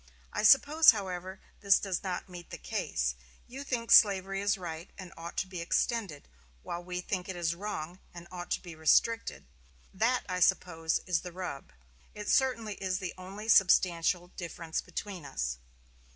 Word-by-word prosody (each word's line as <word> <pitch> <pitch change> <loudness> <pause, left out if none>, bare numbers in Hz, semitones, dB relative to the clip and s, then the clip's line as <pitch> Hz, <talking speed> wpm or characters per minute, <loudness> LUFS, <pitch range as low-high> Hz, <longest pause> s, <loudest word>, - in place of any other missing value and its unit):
I - - -1
suppose, 285 +7 +7
however, 190 -3 0 0.2
this 200 -1 +5
does 190 -3 -2
not 185 -1 -4
meet 175 -2 -10
the - - -7
case. - - -2 0.3
You 270 +3 -8
think 240 -4 -3
slavery 195 -2 +5
is 205 +1 +1
right 170 -1 -7
and 185 -3 -9
ought 170 +1 -9
to 190 - 0
be 185 -2 -6
extended, 185 - -1 0.4
while 175 +1 -5
we 180 0 -4
think 185 +1 -4
it 190 - -4
is 170 -1 0
wrong 180 -2 -6
and 170 0 -11
ought 180 -1 -7
to - - -2
be 175 -2 -9
restricted. 225 +9 +2 0.5
That, 230 +6 +1
I 185 -1 -2
suppose, 165 -2 +1
is 180 -3 +1
the 180 - -8
rub. 175 - -6 0.4
It 210 0 -7
certainly 230 -5 +2
is 185 -1 -1
the 185 -2 -5
only 195 +4 -9
substantial 180 -3 +4
difference 170 -3 -5
between 180 0 -6
us." 65 - -3
185 Hz, 165 wpm, -30 LUFS, 170-205 Hz, 0.5 s, suppose